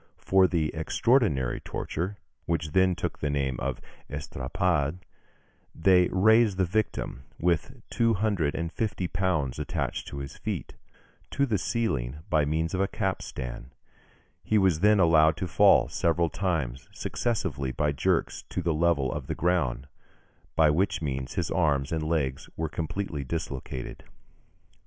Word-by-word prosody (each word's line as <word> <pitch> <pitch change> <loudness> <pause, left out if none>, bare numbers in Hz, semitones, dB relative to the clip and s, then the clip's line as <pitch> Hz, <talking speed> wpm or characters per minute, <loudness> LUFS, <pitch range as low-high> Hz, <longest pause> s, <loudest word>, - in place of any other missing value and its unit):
For 95 -1 +4
the 80 -4 0
extraordinary 80 - +1
torture, 95 +6 -4 0.3
which 80 -2 -1
then 95 +1 +3
took 85 -2 -4
the 75 - -1
name 70 -3 0
of - - -2 0.3
estrapade, 75 +3 -1 0.8
they 90 -2 +5
raised 110 +1 +4
the 95 - +3
victim, 95 -8 -2
with 90 +9 0
two 115 -1 +2
hundred 95 -7 0
and 85 +1 -3
fifty 105 -6 -2
pounds 85 -9 -1
attached 75 -3 -3
to 70 - -7
his 70 -1 -6
feet, - - -4 0.6
to 140 - +1
the 110 -7 0
ceiling 75 - -1
by 75 -3 +3
means 80 +3 -1
of 95 - 0
a 100 - +2
capstan; 65 - -4 0.7
he 110 - +2
was 95 -6 +3
then 105 +2 +5
allowed 80 -2 +5
to 90 - -2
fall - - +5
several 85 +3 +1
times 80 -10 -2
successively 70 - -2
by 75 +3 0
jerks 70 - 0
to 90 - -3
the 85 -1 +1
level 75 -5 +2
of - - -5
the - - -2
ground, 75 -7 0 0.7
by 80 -2 +5
which 90 +1 0
means 65 -3 -3
his - - -1
arms 70 -2 +1
and 80 -1 -1
legs 75 -4 -1
were 80 - -1
completely 80 -1 -3
dislocated 70 -4 -5
(Fig. - - -24
85 Hz, 145 wpm, -27 LUFS, 70-95 Hz, 0.8 s, they